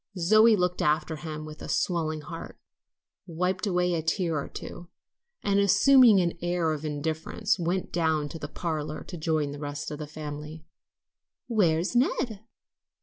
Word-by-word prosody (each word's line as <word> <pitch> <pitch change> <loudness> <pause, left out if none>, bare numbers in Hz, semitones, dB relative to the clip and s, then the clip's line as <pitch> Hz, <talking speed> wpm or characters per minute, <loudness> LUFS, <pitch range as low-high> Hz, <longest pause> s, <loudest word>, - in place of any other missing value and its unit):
Zoe 215 +6 +6
looked 180 -2 0
after 155 +1 +1
him 155 -1 -6
with 155 0 -10
a - - -7
swelling 160 -3 0
heart, 165 +2 -8 0.7
wiped 180 +4 -1
away 180 -1 +1
a 165 - 0
tear 165 -1 0
or - - -8
two, 175 0 -9 0.5
and 200 0 +2
assuming 210 +3 +6
an 170 -1 -1
air 175 -2 0
of 150 -1 -5
indifference, 160 +7 -2
went 175 +2 -1
down 160 -3 +1
to 165 - -8
the 145 - -5
parlor 155 -1 -4
to 180 - -8
join 155 -3 -1
the 145 - -7
rest 145 +1 -5
of 150 - -6
the 150 - -5
family. 150 +1 -8 0.8
"Where's 185 -4 +1
Ned?" 240 -3 +1
165 Hz, 155 wpm, -27 LUFS, 155-185 Hz, 0.8 s, Zoe